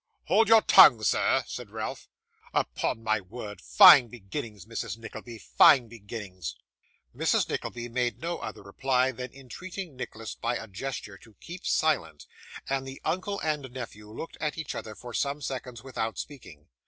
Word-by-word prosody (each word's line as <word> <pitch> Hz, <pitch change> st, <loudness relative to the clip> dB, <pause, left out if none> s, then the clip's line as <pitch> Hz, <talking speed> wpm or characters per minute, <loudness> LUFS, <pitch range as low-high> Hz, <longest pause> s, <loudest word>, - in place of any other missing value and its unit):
'Hold 225 Hz, -, +4 dB
your 225 Hz, -1 st, +7 dB
tongue, 110 Hz, -2 st, +8 dB
sir,' -, -, +2 dB
said -, -, -7 dB
Ralph. -, -, -6 dB, 0.5 s
'Upon 115 Hz, -, -1 dB
my 110 Hz, -1 st, +1 dB
word! 105 Hz, +2 st, -9 dB
Fine 130 Hz, -5 st, +8 dB
beginnings, 105 Hz, -, -7 dB
Mrs 115 Hz, 0 st, -5 dB
Nickleby 115 Hz, +1 st, -9 dB
fine 125 Hz, +2 st, +5 dB
beginnings!' 100 Hz, -, -7 dB, 0.6 s
Mrs. -, -, +2 dB
Nickleby 120 Hz, 0 st, -4 dB
made 120 Hz, -2 st, -1 dB
no 170 Hz, +4 st, -3 dB
other -, -, -7 dB
reply 130 Hz, -1 st, +1 dB
than 125 Hz, +1 st, -7 dB
entreating 170 Hz, +5 st, -8 dB
Nicholas 115 Hz, -3 st, -6 dB
by 120 Hz, +1 st, -2 dB
a 115 Hz, -, -5 dB
gesture 105 Hz, -1 st, -6 dB
to 110 Hz, 0 st, -19 dB
keep 175 Hz, +2 st, -8 dB
silent; 155 Hz, -, 0 dB, 0.4 s
and 135 Hz, 0 st, -2 dB
the 135 Hz, 0 st, -8 dB
uncle 200 Hz, +3 st, -1 dB
and 150 Hz, -4 st, -2 dB
nephew 110 Hz, -4 st, -8 dB
looked 160 Hz, -, -8 dB
at 150 Hz, 0 st, -2 dB
each 160 Hz, -, -4 dB
other 110 Hz, -1 st, -7 dB
for 120 Hz, +2 st, -10 dB
some 140 Hz, +3 st, -1 dB
seconds 130 Hz, -4 st, -6 dB
without 115 Hz, -4 st, -3 dB
speaking. 90 Hz, -, -9 dB
120 Hz, 155 wpm, -28 LUFS, 110-135 Hz, 0.6 s, tongue